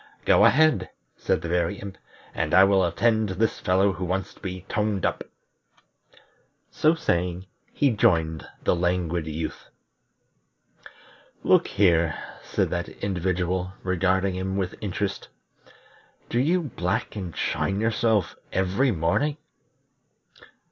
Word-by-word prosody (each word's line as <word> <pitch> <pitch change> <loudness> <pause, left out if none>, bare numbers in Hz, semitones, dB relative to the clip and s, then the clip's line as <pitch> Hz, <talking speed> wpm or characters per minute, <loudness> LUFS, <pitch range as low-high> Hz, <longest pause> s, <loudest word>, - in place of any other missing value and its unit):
"Go - - +6
ahead," 155 +2 +4 0.3
said 80 - -1
the - - -3
Very 85 +3 0
Imp, 100 -1 -8 0.4
"and - - 0
I 95 - +8
will 95 -1 +4
attend 110 +5 +2
to 95 - -4
this 110 +2 0
fellow 95 +2 +2
who 95 - -6
wants 95 +2 -2
to - - -21
be 95 -2 -6
toned 105 -2 -1
up." - - -1 1.5
So 155 +2 +3
saying 90 - -1 0.3
he 140 -2 +2
joined 80 -7 +1 0.2
the - - +2
Languid 85 -2 -1
Youth. 80 +1 -5 1.7
"Look - - +4
here," 85 -5 +2 0.2
said - - -1
that 85 -1 -2
individual, 90 -1 -2
regarding 95 +1 +1
him 95 +1 -3
with 95 -2 -2
interest, 100 0 -3 1.0
"do 120 - 0
you 170 +7 +2
black 90 - -2
and 95 -5 -6
shine 100 0 -1
yourself 110 -3 +1 0.2
every 95 +9 +1
morning?" 115 - 0
95 Hz, 125 wpm, -25 LUFS, 90-105 Hz, 1.7 s, I